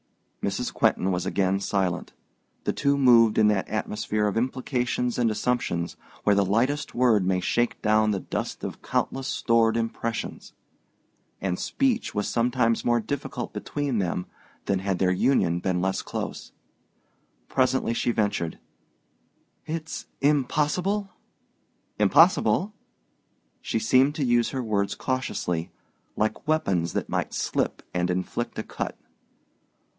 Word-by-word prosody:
Mrs. -, -, -2 dB
Quentin 95 Hz, -, +2 dB
was 90 Hz, -1 st, -1 dB
again 95 Hz, 0 st, +1 dB
silent. 95 Hz, -3 st, -1 dB, 0.5 s
The -, -, 0 dB
two 140 Hz, 0 st, +1 dB
moved 115 Hz, -5 st, +6 dB
in 110 Hz, -, +5 dB
that 105 Hz, -3 st, 0 dB
atmosphere 105 Hz, 0 st, -1 dB
of 105 Hz, -, 0 dB
implications 125 Hz, 0 st, -1 dB
and 120 Hz, -2 st, +3 dB
assumptions 110 Hz, -7 st, -1 dB, 0.3 s
where 105 Hz, -, +4 dB
the 100 Hz, 0 st, +3 dB
lightest 125 Hz, +9 st, 0 dB
word 120 Hz, -5 st, +4 dB
may 90 Hz, 0 st, +1 dB
shake 120 Hz, +6 st, 0 dB
down 110 Hz, 0 st, +3 dB
the 100 Hz, -2 st, 0 dB
dust -, -, -4 dB
of -, -, -5 dB
countless 135 Hz, 0 st, -1 dB
stored 115 Hz, -2 st, +2 dB
impressions; 115 Hz, 0 st, -3 dB, 0.9 s
and 95 Hz, -2 st, -2 dB
speech 255 Hz, -, 0 dB
was 105 Hz, -, 0 dB
sometimes 115 Hz, -1 st, +1 dB
more 120 Hz, 0 st, +3 dB
difficult 140 Hz, +5 st, -4 dB
between 145 Hz, -6 st, -2 dB
them 90 Hz, -1 st, -1 dB, 0.4 s
than 100 Hz, -1 st, +1 dB
had 95 Hz, -1 st, -1 dB
their 95 Hz, 0 st, +2 dB
union 90 Hz, -4 st, +2 dB
been 90 Hz, 0 st, 0 dB
less 95 Hz, +1 st, 0 dB
close. -, -, -5 dB, 1.0 s
Presently 130 Hz, -2 st, +1 dB
she 115 Hz, -, 0 dB
ventured, 105 Hz, -7 st, 0 dB, 1.1 s
"It's 160 Hz, 0 st, -5 dB
impossible?" 150 Hz, +8 st, +1 dB, 0.9 s
"Impossible?" 175 Hz, -, +4 dB, 0.9 s
She -, -, -2 dB
seemed 130 Hz, +6 st, +3 dB
to 145 Hz, -, 0 dB
use 120 Hz, -1 st, +3 dB
her 130 Hz, -2 st, -3 dB
words 100 Hz, -3 st, 0 dB
cautiously, 90 Hz, -10 st, -2 dB, 0.5 s
like 110 Hz, +8 st, -1 dB
weapons 95 Hz, -, +1 dB
that -, -, -2 dB
might -, -, -2 dB
slip -, -, -1 dB
and 90 Hz, 0 st, 0 dB
inflict 90 Hz, 0 st, -2 dB
a -, -, -2 dB
cut. -, -, -5 dB
115 Hz, 130 wpm, -26 LUFS, 95-130 Hz, 1.1 s, moved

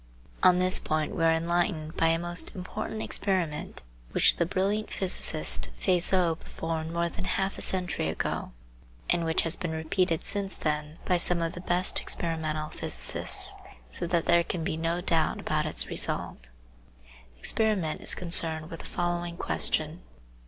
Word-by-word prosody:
On 180 Hz, -1 st, +6 dB
this 185 Hz, 0 st, +7 dB
point 155 Hz, -1 st, -1 dB
we 165 Hz, -, -1 dB
axe 165 Hz, 0 st, +4 dB
enlightened 165 Hz, -2 st, -1 dB
by 165 Hz, -, +3 dB
a 165 Hz, 0 st, +3 dB
most 175 Hz, +1 st, 0 dB
important 190 Hz, +4 st, -5 dB
experiment 180 Hz, -7 st, -1 dB, 0.3 s
which -, -, +4 dB
the 170 Hz, -, +1 dB
brilliant 200 Hz, +4 st, 0 dB
physicist 65 Hz, -, 0 dB
Fizeau 180 Hz, -1 st, +4 dB
performed 165 Hz, 0 st, -4 dB
more 170 Hz, 0 st, 0 dB
than 180 Hz, +2 st, -6 dB
half 195 Hz, +1 st, -1 dB
a -, -, -7 dB
century 180 Hz, -, 0 dB
ago, 80 Hz, -, -2 dB, 0.6 s
and 170 Hz, -, +2 dB
which 160 Hz, 0 st, +1 dB
has 165 Hz, +1 st, -1 dB
been 180 Hz, -3 st, -4 dB
repeated 160 Hz, +1 st, 0 dB
since 200 Hz, -1 st, -3 dB
then 150 Hz, 0 st, -2 dB
by 180 Hz, -, +3 dB
some 175 Hz, 0 st, +1 dB
of 165 Hz, 0 st, -1 dB
the 175 Hz, -, -7 dB
best 180 Hz, 0 st, +1 dB
experimental 155 Hz, -2 st, -2 dB
physicists, -, -, 0 dB, 0.4 s
so 175 Hz, -, -1 dB
that 170 Hz, -1 st, +1 dB
there 170 Hz, 0 st, +4 dB
can 170 Hz, 0 st, -3 dB
be 160 Hz, -, -1 dB
no 165 Hz, +2 st, -1 dB
doubt 165 Hz, -3 st, +1 dB
about 155 Hz, 0 st, -1 dB
its 155 Hz, -, 0 dB
result. -, -, -3 dB, 0.9 s
The -, -, -26 dB
experiment 195 Hz, -, 0 dB
is -, -, +3 dB
concerned 165 Hz, -3 st, +2 dB
with 165 Hz, -, -6 dB
the -, -, -8 dB
following 175 Hz, -1 st, -2 dB
question. 155 Hz, 0 st, -1 dB
170 Hz, 160 wpm, -28 LUFS, 160-180 Hz, 0.9 s, this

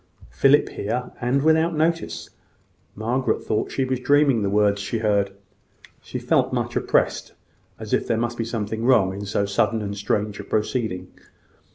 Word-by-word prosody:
Philip 140 Hz, +2 st, +4 dB
here, 125 Hz, +5 st, -3 dB
and 130 Hz, +3 st, +1 dB
without 160 Hz, +1 st, +3 dB
notice! 165 Hz, +2 st, -1 dB, 0.6 s
Margaret 120 Hz, +5 st, -1 dB
thought 105 Hz, -, -1 dB
she 135 Hz, -, 0 dB
was 130 Hz, -1 st, -1 dB
dreaming 140 Hz, -3 st, +3 dB
the 100 Hz, -, 0 dB
words 100 Hz, 0 st, +2 dB
she 105 Hz, +3 st, -2 dB
heard. 105 Hz, -2 st, +1 dB, 0.7 s
She -, -, -6 dB
felt -, -, +1 dB
much -, -, -2 dB
oppressed -, -, 0 dB, 0.4 s
as -, -, -6 dB
if -, -, +1 dB
there 115 Hz, -, +1 dB
must 120 Hz, +1 st, -1 dB
be -, -, +1 dB
something 110 Hz, -1 st, -3 dB
wrong 110 Hz, -7 st, +4 dB
in 100 Hz, +1 st, -6 dB
so 100 Hz, 0 st, 0 dB
sudden 100 Hz, +3 st, +1 dB
and 100 Hz, 0 st, -4 dB
strange 105 Hz, +1 st, -2 dB
a -, -, -5 dB
proceeding. 105 Hz, -3 st, -2 dB
110 Hz, 165 wpm, -23 LUFS, 100-130 Hz, 0.7 s, Philip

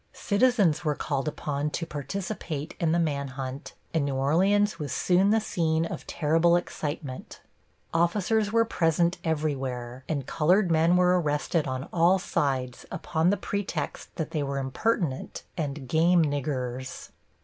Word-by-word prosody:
Citizens 200 Hz, -7 st, +2 dB
were 150 Hz, -2 st, +1 dB
called 140 Hz, -1 st, -2 dB
upon 150 Hz, -1 st, -2 dB
to 165 Hz, +2 st, -3 dB
participate 155 Hz, -, -4 dB
in 165 Hz, -2 st, +2 dB
the 170 Hz, -, +3 dB
man 145 Hz, -4 st, 0 dB
hunt 135 Hz, +2 st, -6 dB, 0.2 s
and 160 Hz, -3 st, +2 dB
New 140 Hz, -1 st, -1 dB
Orleans 185 Hz, +8 st, +2 dB
was 145 Hz, -3 st, -4 dB
soon 185 Hz, +2 st, +3 dB
the 220 Hz, +1 st, +4 dB
scene 165 Hz, -6 st, 0 dB
of -, -, -6 dB
terrible 165 Hz, +2 st, +3 dB
excitement. 150 Hz, -5 st, -4 dB, 0.5 s
Officers 200 Hz, +5 st, +2 dB
were 230 Hz, 0 st, +4 dB
present 170 Hz, -3 st, +1 dB
everywhere, 135 Hz, -6 st, -2 dB
and 140 Hz, -5 st, -1 dB
colored 175 Hz, +6 st, +2 dB
men 165 Hz, +2 st, +4 dB
were 180 Hz, 0 st, +4 dB
arrested 150 Hz, +1 st, 0 dB
on 130 Hz, +1 st, -3 dB
all 175 Hz, +2 st, +5 dB
sides 130 Hz, -8 st, -1 dB
upon 160 Hz, +1 st, 0 dB
the 205 Hz, -, +2 dB
pretext 190 Hz, -7 st, -4 dB
that 160 Hz, -, -3 dB
they 155 Hz, -, -1 dB
were 140 Hz, -1 st, -2 dB
impertinent 135 Hz, -, -1 dB
and 145 Hz, -4 st, -4 dB
"game 165 Hz, +4 st, +4 dB
niggers." 130 Hz, -3 st, -3 dB
160 Hz, 145 wpm, -27 LUFS, 140-180 Hz, 0.5 s, all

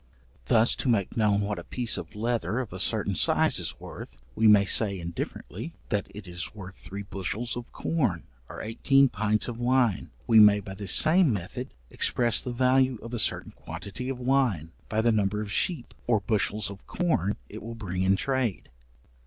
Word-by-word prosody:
Thus, 110 Hz, -, +3 dB
to 130 Hz, -, -1 dB
make 100 Hz, -6 st, +1 dB
known 105 Hz, -2 st, +2 dB
what 100 Hz, 0 st, -2 dB
a -, -, -8 dB
piece 120 Hz, -3 st, -2 dB
of -, -, -6 dB
leather 115 Hz, +1 st, -1 dB
of 125 Hz, -6 st, -5 dB
a -, -, -6 dB
certain -, -, +1 dB
size -, -, +2 dB
is -, -, -4 dB
worth, -, -, -10 dB, 0.2 s
we 110 Hz, -, +3 dB
may 105 Hz, -2 st, +6 dB
say 100 Hz, -1 st, +2 dB
indifferently, 85 Hz, -, -6 dB
that 105 Hz, -1 st, -1 dB
it 105 Hz, -2 st, -10 dB
is 90 Hz, +3 st, -4 dB
worth 95 Hz, -3 st, -9 dB
three 100 Hz, +1 st, -8 dB
bushels 100 Hz, +4 st, -4 dB
of 120 Hz, -1 st, -7 dB
corn, 125 Hz, -, -1 dB, 0.3 s
or -, -, -7 dB
eighteen 135 Hz, +5 st, +3 dB
pints 110 Hz, 0 st, 0 dB
of 120 Hz, -1 st, -6 dB
wine. 120 Hz, -4 st, +1 dB, 0.2 s
We 115 Hz, -1 st, +6 dB
may 105 Hz, -1 st, +7 dB
by 95 Hz, -1 st, -8 dB
the 100 Hz, +1 st, -7 dB
same 160 Hz, -, +5 dB
method 95 Hz, -6 st, -5 dB, 0.2 s
express 120 Hz, -3 st, +2 dB
the 125 Hz, -, -4 dB
value 130 Hz, +1 st, +2 dB
of 115 Hz, +1 st, -8 dB
a 120 Hz, -, -1 dB
certain -, -, +1 dB
quantity 100 Hz, +10 st, -7 dB
of 135 Hz, -, -3 dB
wine, 125 Hz, -, +1 dB, 0.2 s
by 110 Hz, 0 st, +1 dB
the 115 Hz, +1 st, +3 dB
number 105 Hz, -1 st, +1 dB
of 105 Hz, -1 st, -5 dB
sheep, 155 Hz, -, -1 dB
or 115 Hz, -3 st, +3 dB
bushels 105 Hz, 0 st, -1 dB
of 100 Hz, -, -13 dB
corn 130 Hz, -, 0 dB
it 110 Hz, -, -9 dB
will 115 Hz, +2 st, -7 dB
bring 95 Hz, -5 st, -4 dB
in 95 Hz, +1 st, +3 dB
trade. 130 Hz, -3 st, -2 dB
110 Hz, 190 wpm, -27 LUFS, 100-120 Hz, 0.3 s, may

